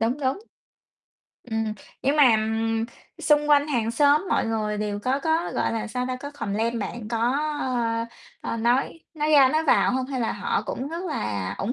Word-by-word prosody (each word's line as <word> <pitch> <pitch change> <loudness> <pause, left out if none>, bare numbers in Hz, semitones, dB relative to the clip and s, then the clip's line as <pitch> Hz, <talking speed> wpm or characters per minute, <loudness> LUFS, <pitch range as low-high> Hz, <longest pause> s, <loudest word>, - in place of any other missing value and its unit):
đúng, 230 +4 +1
đúng. 265 +5 0 1.1
Ừm, 220 -2 -2 0.3
nhưng 280 +3 +2
mà 255 -7 +6 0.8
xung 295 0 +3
quanh 290 0 +5
hàng 230 -5 0
xóm 290 +8 +3
mọi - - +1
người 215 -2 -1
đều 210 -1 -2
có 255 +6 0
có, 320 +3 0
gọi - - 0
là, 225 0 -2
sao 250 +2 -3
ta, 255 - -2
có 285 +3 -7
complain 230 -3 -2
bạn 215 +1 -5
có, 230 - -1 0.4
ơ, 230 -3 -1 0.5
ơ, - - -2
nói 245 +7 +1
nói 305 0 0
ra 280 -3 +7
nói 310 +4 +1
vào 280 - +4
hông 260 0 -1
hay 265 -2 -3
là 230 - 0
họ - - -1
cũng 265 - -4
rất 335 +4 -5
là 100 - -3
ủng 210 +5 -1
250 Hz, 190 wpm, -25 LUFS, 225-285 Hz, 1.1 s, ra